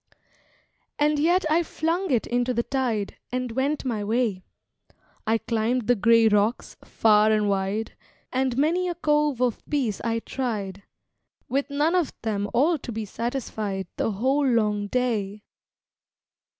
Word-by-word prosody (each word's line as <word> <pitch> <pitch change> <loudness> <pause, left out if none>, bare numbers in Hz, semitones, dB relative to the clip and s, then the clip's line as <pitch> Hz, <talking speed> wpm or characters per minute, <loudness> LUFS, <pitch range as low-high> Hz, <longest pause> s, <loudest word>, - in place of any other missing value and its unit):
And 295 0 +2
yet 345 +4 +3
I 315 +2 +3
flung 340 +3 -2
it 245 -5 +1
into 245 +1 0
the 235 - +1
tide, 240 -7 -2
And 255 -1 -2
went 275 +4 -1
my 225 -5 -1
way. 220 -3 0 0.9
I 225 +1 +3
climbed 230 +1 -1
the 245 - +4
gray 230 +2 +5
rocks, 210 +2 +1
far 215 -1 +4
and 215 -1 +2
wide, 200 +2 -1 0.4
And 260 -1 0
many 340 +6 +2
a 350 - -3
cove 300 -5 +1
of 245 -3 -1
peace 255 -9 -1
I 230 -1 0
tried, 215 -6 -4 0.7
With 275 +3 -1
none 295 +4 +1
of 355 -5 +1
them 205 -2 -1
all 310 +5 +2
to 245 - -7
be 220 -1 -4
satisfied, 215 -4 -3
The 220 - 0
whole 265 +7 +1
long 210 -4 +1
day. 215 -4 -1
240 Hz, 145 wpm, -25 LUFS, 215-280 Hz, 0.9 s, gray